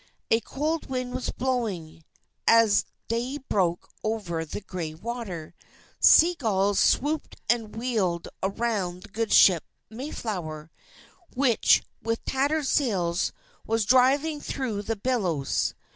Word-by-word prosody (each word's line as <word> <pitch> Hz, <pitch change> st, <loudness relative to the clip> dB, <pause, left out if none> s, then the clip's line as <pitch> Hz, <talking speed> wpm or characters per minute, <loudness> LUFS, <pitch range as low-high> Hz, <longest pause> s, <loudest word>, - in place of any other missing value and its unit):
A 225 Hz, -, +5 dB
cold 300 Hz, +8 st, -3 dB
wind 255 Hz, -1 st, -3 dB
was -, -, -3 dB
blowing, 215 Hz, -12 st, -3 dB, 0.4 s
as 225 Hz, -3 st, +5 dB, 0.2 s
day 240 Hz, +5 st, -2 dB
broke 185 Hz, -10 st, -1 dB, 0.2 s
over 200 Hz, -7 st, -2 dB
the 160 Hz, -, -6 dB
gray 170 Hz, -5 st, -5 dB
water. 190 Hz, -5 st, -6 dB, 0.5 s
Sea 340 Hz, +3 st, +7 dB
gulls 205 Hz, -, +1 dB
swooped 300 Hz, +4 st, +1 dB
and 225 Hz, -2 st, 0 dB
wheeled 215 Hz, -8 st, -1 dB
around 195 Hz, -3 st, -2 dB
the 220 Hz, -, -13 dB
good 225 Hz, +2 st, -2 dB
ship 175 Hz, -5 st, +6 dB, 0.3 s
Mayflower, 180 Hz, -, -5 dB, 0.6 s
which, 250 Hz, -3 st, +4 dB, 0.2 s
with 230 Hz, +1 st, -3 dB
tattered 285 Hz, +3 st, 0 dB
sails, 190 Hz, -, +1 dB, 0.4 s
was 225 Hz, -1 st, +1 dB
driving 275 Hz, +6 st, +3 dB
through 235 Hz, -7 st, -3 dB
the 225 Hz, +2 st, -2 dB
billows. 195 Hz, -, -1 dB
225 Hz, 115 wpm, -26 LUFS, 185-255 Hz, 0.6 s, Sea